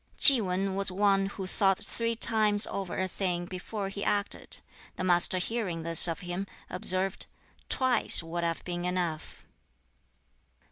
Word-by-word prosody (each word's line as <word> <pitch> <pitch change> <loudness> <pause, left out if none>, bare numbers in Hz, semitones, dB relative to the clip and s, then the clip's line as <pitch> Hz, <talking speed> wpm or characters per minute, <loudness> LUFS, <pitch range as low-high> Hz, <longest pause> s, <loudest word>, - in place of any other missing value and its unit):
Ki 270 -5 +10
Wan 190 0 -3
was 195 0 -1
one 195 0 0
who 195 -1 -8
thought 195 0 0
three 230 0 -5
times 215 -2 +2
over 195 -3 -6
a 190 - -2
thing 180 -2 -4
before 195 +3 -7
he 200 +1 -7
acted. 205 0 -2 0.4
The - - -6
Master 180 0 +3
hearing 185 -4 -5
this 165 +1 +7
of 165 +2 -5
him, 180 +2 -6 0.2
observed, 185 +1 -2 0.4
"Twice 255 -8 +4
would 170 +1 -6
have 165 -1 -4
been 175 -1 -6
enough." 175 -3 -5
190 Hz, 145 wpm, -27 LUFS, 175-205 Hz, 0.4 s, Ki